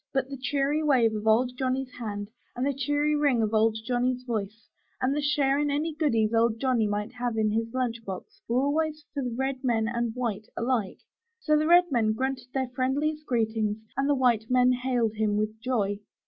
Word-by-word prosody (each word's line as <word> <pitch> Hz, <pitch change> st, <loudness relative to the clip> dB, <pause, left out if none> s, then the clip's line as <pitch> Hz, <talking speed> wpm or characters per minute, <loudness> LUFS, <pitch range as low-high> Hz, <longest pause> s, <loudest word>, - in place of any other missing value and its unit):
But 270 Hz, 0 st, 0 dB
the 275 Hz, -, -5 dB
cheery 280 Hz, +3 st, 0 dB
wave 255 Hz, -7 st, +3 dB
of 215 Hz, 0 st, -4 dB
Old 245 Hz, +3 st, +3 dB
Johnny's 260 Hz, 0 st, -1 dB
hand 205 Hz, -2 st, -5 dB, 0.2 s
and 250 Hz, +2 st, -1 dB
the 280 Hz, -, +1 dB
cheery 290 Hz, +3 st, 0 dB
ring 280 Hz, -6 st, +2 dB
of 215 Hz, 0 st, -1 dB
Old 220 Hz, 0 st, +3 dB
Johnny's 250 Hz, +1 st, 0 dB
voice, 220 Hz, -2 st, -4 dB, 0.3 s
and 265 Hz, +2 st, +1 dB
the 295 Hz, -, 0 dB
share 285 Hz, -1 st, +2 dB
in 295 Hz, 0 st, +1 dB
any 300 Hz, +3 st, -1 dB
goodies 235 Hz, -9 st, +1 dB
Old 225 Hz, 0 st, +2 dB
Johnny 250 Hz, -4 st, +2 dB
might 210 Hz, +2 st, -2 dB
have 245 Hz, -2 st, -3 dB
in 215 Hz, -1 st, +2 dB
his 225 Hz, +1 st, -1 dB
lunch 240 Hz, -2 st, -2 dB
box, 195 Hz, +2 st, -8 dB
were 245 Hz, +3 st, +2 dB
always 305 Hz, +1 st, -1 dB
for 285 Hz, -, -2 dB
red 265 Hz, +2 st, -3 dB
man 225 Hz, -3 st, +1 dB
and 235 Hz, -1 st, -2 dB
white 220 Hz, -4 st, -3 dB
alike; 235 Hz, -5 st, -1 dB, 0.4 s
so 305 Hz, -9 st, +2 dB
the 305 Hz, +1 st, +2 dB
red 350 Hz, 0 st, +5 dB
men 220 Hz, -4 st, +2 dB
grunted 260 Hz, +1 st, -3 dB
their 260 Hz, -2 st, -1 dB
friendliest 285 Hz, +5 st, -1 dB
greetings, 220 Hz, -3 st, 0 dB, 0.2 s
and 275 Hz, +1 st, 0 dB
the 290 Hz, -, +4 dB
white 235 Hz, -4 st, +2 dB
men 250 Hz, 0 st, +4 dB
hailed 245 Hz, -3 st, 0 dB
him 210 Hz, -1 st, +1 dB
with 215 Hz, +1 st, -2 dB
joy. 210 Hz, -6 st, 0 dB
250 Hz, 200 wpm, -27 LUFS, 220-275 Hz, 0.4 s, red